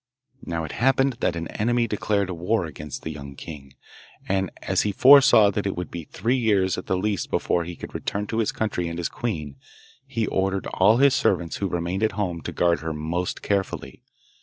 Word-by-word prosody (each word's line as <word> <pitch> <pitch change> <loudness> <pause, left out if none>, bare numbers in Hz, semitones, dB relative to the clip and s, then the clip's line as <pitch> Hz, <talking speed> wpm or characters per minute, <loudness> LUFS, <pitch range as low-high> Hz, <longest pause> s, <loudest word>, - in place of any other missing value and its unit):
Now 85 -1 -3
it 80 - -5
happened 135 0 +2
that 85 - 0
an 85 0 -4
enemy 120 +2 +1
declared 100 -2 0
war 90 +3 0
against 75 -2 -8
the 80 - -4
young 70 -2 -9
king; 70 -3 -10 0.5
and, 95 -1 0
as - - +1
he 105 - 0
foresaw 125 -3 +7
that 100 0 -2
it 95 - -2
would 90 - -5
be 85 -2 -6
three 120 - -1
years 100 -6 +2
at 90 - -7
the 95 - +1
least 100 0 -1
before 85 -1 0
he 85 0 -7
could - - -9
return 105 +1 -3
to 110 +2 -2
his 110 - +1
country 100 -6 -2
and 85 0 -5
his 85 - -2
queen, 75 - -4 0.5
he 115 -1 -1
ordered 95 0 -1
all 105 +5 +5
his 140 +1 +5
servants 85 -9 +1
who 100 - -1
remained 90 +3 -2
at 110 - +1
home 90 -5 -2
to - - -5
guard 85 -1 +2
her 80 0 -4
most 80 +4 -3
carefully. 100 -1 -2
95 Hz, 205 wpm, -24 LUFS, 85-110 Hz, 0.5 s, foresaw